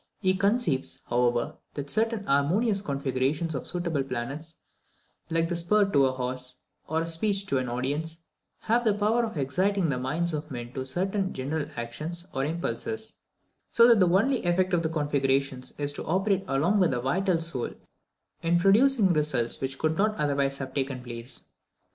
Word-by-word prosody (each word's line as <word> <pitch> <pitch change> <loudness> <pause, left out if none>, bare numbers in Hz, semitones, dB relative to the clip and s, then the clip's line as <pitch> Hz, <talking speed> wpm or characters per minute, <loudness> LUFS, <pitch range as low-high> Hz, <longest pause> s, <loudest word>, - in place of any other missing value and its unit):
He 185 -3 +2
conceives, 195 - +1
however, 120 -1 +1 0.2
that 145 -1 -4
certain 225 +1 +1
harmonious 195 +8 +2
configurations 140 +1 -1
of 135 - -4
suitable 170 -5 -1
planets, 140 +6 -5 0.7
like 165 0 +1
the 175 - -2
spur 200 +5 +3
to 140 -5 +5
a - - 0
horse, 125 0 -3 0.3
or 160 +1 0
a - - -3
speech 195 +4 0
to 140 -9 0
an 125 -1 -3
audience, 145 +7 -2 0.4
have 235 +2 +2
the 215 -3 +3
power 215 +3 +2
of 220 -7 -4
exciting 185 +6 +1
the 125 -2 -1
minds 160 +7 -1
of 150 0 -4
men 120 -2 -6
to 130 -1 -4
certain 190 +6 -1
general 145 +3 -2
actions 155 +9 -5
or 135 - -1
impulses; 220 +8 -3 0.5
so 235 0 +6
that 230 -3 +6
the 180 -2 +5
only 225 +9 +2
effect 185 +2 +1
of 170 - +3
these 160 -1 -1
configurations 140 -4 0
is 145 0 +2
to - - -5
operate 195 +3 +1
along 165 +10 +2
with 180 -3 +4
the 125 - -1
vital 175 +8 +1
soul 160 -7 -3 0.7
in 170 +1 +2
producing 205 +2 +4
results 145 -7 0
which 135 +1 -4
would 160 +2 +1
not 215 +1 +2
otherwise 140 -3 0
have 135 -1 -6
taken 135 -2 -2
place. 120 +1 -7
160 Hz, 170 wpm, -27 LUFS, 135-195 Hz, 0.7 s, so